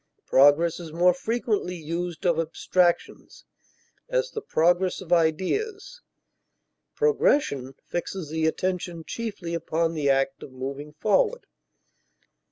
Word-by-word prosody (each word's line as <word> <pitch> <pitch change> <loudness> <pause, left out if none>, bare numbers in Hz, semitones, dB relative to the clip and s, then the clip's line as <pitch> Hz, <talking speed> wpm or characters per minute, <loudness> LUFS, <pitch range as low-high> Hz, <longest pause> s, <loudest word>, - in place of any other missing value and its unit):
Progress 145 +6 +4
is 165 -3 -8
more 175 +3 +4
frequently 210 -1 -2
used 170 +1 -5
of 170 -2 +3
abstractions; 175 +2 -1 0.6
as, - - 0
the 440 - -5
progress 175 - +2
of 180 -2 -2
ideas; 395 - 0 0.9
progression 295 - +1
fixes 175 -2 -4
the 160 0 +1
attention 175 0 -2
chiefly 205 -7 -5
upon 165 0 -1
the 150 -3 0
act 135 0 +1
of - - -10
moving 135 +3 -6
forward. 465 - +1
175 Hz, 110 wpm, -25 LUFS, 160-210 Hz, 0.9 s, Progress